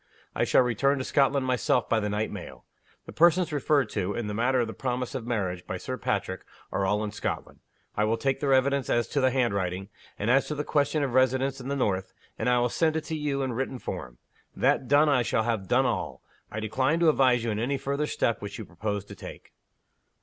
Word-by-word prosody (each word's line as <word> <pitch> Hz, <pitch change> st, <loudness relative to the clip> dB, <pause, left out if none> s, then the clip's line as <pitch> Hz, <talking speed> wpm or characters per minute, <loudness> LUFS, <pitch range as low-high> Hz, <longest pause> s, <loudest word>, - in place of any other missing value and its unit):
I -, -, +1 dB
shall -, -, +4 dB
return 130 Hz, +4 st, +1 dB
to 130 Hz, -, -2 dB
Scotland 135 Hz, 0 st, +2 dB
myself 125 Hz, -1 st, +1 dB
by 115 Hz, -, +2 dB
the 105 Hz, -1 st, -2 dB
night 105 Hz, +1 st, -1 dB
mail. -, -, -9 dB, 0.4 s
The -, -, -9 dB
persons 170 Hz, 0 st, +4 dB
referred 145 Hz, -3 st, +2 dB
to, 100 Hz, -1 st, -2 dB
in 120 Hz, -, -2 dB
the 105 Hz, -, -3 dB
matter 125 Hz, +4 st, +2 dB
of 120 Hz, -, +2 dB
the 110 Hz, -, -6 dB
promise 125 Hz, 0 st, -3 dB
of 125 Hz, -4 st, -5 dB
marriage, 95 Hz, -7 st, -2 dB
by -, -, -3 dB
Sir -, -, -4 dB
Patrick, -, -, -2 dB, 0.3 s
are 95 Hz, -, 0 dB
all 105 Hz, +2 st, +1 dB
in 105 Hz, -, -3 dB
Scotland. 105 Hz, -, -4 dB, 0.4 s
I 105 Hz, -, +2 dB
will 115 Hz, +1 st, +1 dB
take 135 Hz, +3 st, 0 dB
their 140 Hz, -2 st, 0 dB
evidence 135 Hz, 0 st, +2 dB
as 120 Hz, -1 st, +2 dB
to 145 Hz, -, 0 dB
the 130 Hz, -, +4 dB
handwriting, 100 Hz, -7 st, -1 dB, 0.3 s
and 105 Hz, +4 st, 0 dB
as 135 Hz, +2 st, +3 dB
to 150 Hz, -, -3 dB
the 150 Hz, -, -2 dB
question 145 Hz, 0 st, +1 dB
of 135 Hz, -4 st, -2 dB
residence 130 Hz, +1 st, +2 dB
in 125 Hz, -, -7 dB
the 140 Hz, -, -1 dB
North 95 Hz, -8 st, -1 dB, 0.3 s
and -, -, +1 dB
I 125 Hz, -, +4 dB
will 120 Hz, 0 st, +2 dB
send 160 Hz, +4 st, +1 dB
it 160 Hz, -, -1 dB
to 160 Hz, -, -4 dB
you 145 Hz, -2 st, -1 dB
in 130 Hz, -2 st, -2 dB
written 130 Hz, +2 st, -3 dB
form. 60 Hz, -, -6 dB, 0.4 s
That 130 Hz, -, +2 dB
done, 145 Hz, +3 st, +5 dB
I 140 Hz, -4 st, +4 dB
shall 115 Hz, -1 st, +1 dB
have 110 Hz, -4 st, -1 dB
done -, -, +3 dB
all. -, -, -2 dB, 0.3 s
I 110 Hz, -, -5 dB
decline 130 Hz, +9 st, 0 dB
to 165 Hz, -, +6 dB
advise 130 Hz, -5 st, +3 dB
you 115 Hz, -, -1 dB
in 105 Hz, -, -2 dB
any 135 Hz, +5 st, 0 dB
future 140 Hz, +2 st, -2 dB
step 115 Hz, -5 st, 0 dB
which 100 Hz, 0 st, -6 dB
you -, -, -7 dB
propose 100 Hz, +4 st, -4 dB
to 100 Hz, -, -10 dB
take." -, -, -11 dB
125 Hz, 235 wpm, -27 LUFS, 110-140 Hz, 0.4 s, to